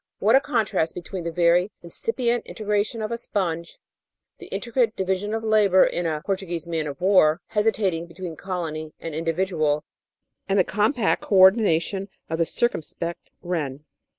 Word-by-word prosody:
What 220 +5 +4
a - - +8
contrast 220 - 0
between 180 0 -6
the 170 - -2
very 175 +2 +3
incipient 240 - -1
integration 210 +1 -1
of 215 - -3
a 235 - -2
sponge, 170 -6 -3 0.6
the - - -9
intricate 235 -2 0
division 190 +2 -1
of 225 - -3
labour 210 -4 +5
in 175 -1 0
a 155 -2 -2
"Portuguese 185 -4 -2
Man 165 -2 -2
of 140 -2 -6
War" 180 -4 +4
hesitating 205 -6 0
between 170 -1 -7
colony 160 -5 -5
and 165 - -6
individ 165 +4 -1
ual, 150 -3 +1 0.7
and 195 - +2
the 190 - +5
compact 215 +3 +1
co 205 - -1
ordination 190 -1 +4 0.2
of 160 - -1
the 165 - +2
circumspect 170 -6 -3
wren. 150 -5 -3
185 Hz, 155 wpm, -24 LUFS, 165-210 Hz, 0.7 s, a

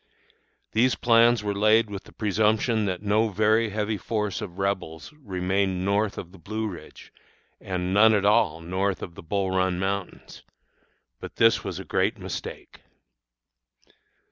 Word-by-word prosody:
These 125 +4 +2
plans 115 -1 +4
were 105 -1 -1
laid 110 +2 +3
with 100 -1 -7
the - - -15
presumption 110 +1 +1
that 95 0 -3
no 105 +2 +2
very 110 +2 +2
heavy 105 +1 -2
force 105 -1 -3
of 90 - -7
Rebels 95 - -3
remained 95 -6 -2
north 100 +1 0
of 90 - -7
the 95 - -15
Blue 110 +5 -4
Ridge, 95 -5 -11 0.5
and 90 -1 -3
none 110 +2 +6
at 100 -1 +1
all 100 -6 +3
north 95 +3 -2
of 85 - -7
the - - -11
Bull 95 +3 -2
Run 95 -1 +1
Mountains. 95 +1 -4 0.8
But - - -9
this 115 0 +4
was 95 -4 -5
a 95 - -7
great - - 0
mistake. - - -7
100 Hz, 150 wpm, -25 LUFS, 95-110 Hz, 0.8 s, none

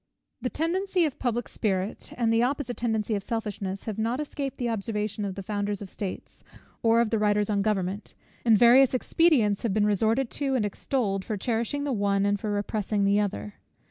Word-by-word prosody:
The 250 - -1
tendency 360 +4 +1
of 295 - -3
public 240 -1 -1
spirit, 195 -1 -2
and 230 -2 +2
the 225 - +3
opposite 255 0 -1
tendency 220 -2 -1
of 200 - -1
selfishness, 200 -3 -4
have 220 -1 -4
not 230 +4 0
escaped 285 -2 -4
the 245 - -1
observation 210 -1 -2
of 195 -2 -4
the 195 - -6
founders 205 0 -2
of 200 -3 -7
states, 195 -3 -7 0.4
or 230 0 +4
of 235 - 0
the 225 - +1
writers 210 0 +2
on 200 -1 +1
government; 200 -1 -2 0.3
and 225 -3 +5
various 250 +3 +6
expedients 255 - +3
have 220 -4 -1
been 210 -1 +3
resorted 220 +5 +1
to 275 -2 -1
and 225 -5 +1
extolled, 205 -2 -1
for 215 0 -3
cherishing 235 +6 -1
the 285 -2 -1
one, 200 -2 +1
and 205 0 +1
for 215 - -3
repressing 205 0 -1
the 200 +1 +3
other. 105 - -3
220 Hz, 195 wpm, -27 LUFS, 205-245 Hz, 0.4 s, various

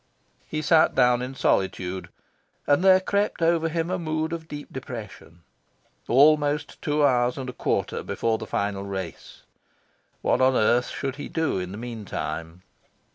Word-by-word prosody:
He 155 0 -3
sat 160 +1 +4
down 125 0 +4
in 130 +2 -5
solitude; 95 -5 0 0.6
and 145 +5 +3
there 190 -1 +7
crept 200 +2 -1
over 165 -1 +2
him 165 +2 -2
a 185 - -1
mood 160 0 -2
of 165 -1 -6
deep 145 -1 -8
depression... 110 - -9 0.6
Almost 145 +2 +3
two 150 -1 +2
hours 125 -2 +2
and 135 -1 -5
a 125 - -5
quarter - - -1
before 115 -1 -1
the - - -7
final 100 -1 -2
races! 95 -3 -7 0.8
What - - +2
on 130 0 +4
earth 120 +2 +3
should 135 -1 -4
he 145 - -6
do 160 - 0
in 90 0 -5
the 100 - -7
meantime? 90 -7 -6
130 Hz, 155 wpm, -25 LUFS, 105-155 Hz, 0.8 s, there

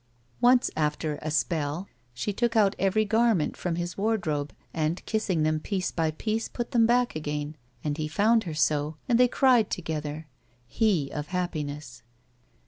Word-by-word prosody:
Once 245 0 +4
after 150 0 -1
a 155 - -3
*'spell" 155 +2 -1 0.2
she 125 - -3
took 235 +3 0
out 210 -2 +4
every 200 +3 +2
garment 220 -5 +2
from 175 -2 -2
his 175 +2 -4
wardrobe 165 -10 0 0.2
and, 160 +2 -1
kissing 195 -7 0
them 155 0 +1
piece 185 +2 -2
by 160 -2 0
piece, 215 +8 -2
put 240 -1 -5
them 230 -2 +4
back 245 -2 +2
again, 150 0 -3 0.3
and 150 0 -2
he 155 - -1
found 220 +8 +3
her 165 - -4
so, 150 +1 +1
and 240 -2 +3
they 250 - +7
cried 245 -4 +4
together, 155 -2 -4 0.4
he 170 - +1
of 150 0 -4
happiness. 150 -8 -4
170 Hz, 160 wpm, -27 LUFS, 150-220 Hz, 0.4 s, they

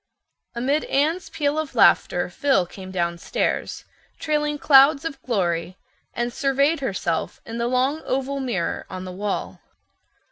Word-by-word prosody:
Amid 275 +6 0
Anne's 315 +6 0
peal 295 0 -1
of 315 -3 -5
laughter - - +4
Phil 270 -11 +1
came 185 +2 -10
downstairs, 170 -2 -2 0.3
trailing 300 -1 -1
clouds 280 +1 +6
of 280 -5 -5
glory, 180 -6 -1 0.4
and 240 0 -2
surveyed 280 +4 +1
herself 190 -10 -2
in 230 +1 -6
the 235 - 0
long 260 +5 +1
oval 270 +1 -1
mirror 235 -10 -2
on 185 0 -6
the 185 - -6
wall. 200 +2 -4
260 Hz, 135 wpm, -23 LUFS, 190-285 Hz, 0.4 s, clouds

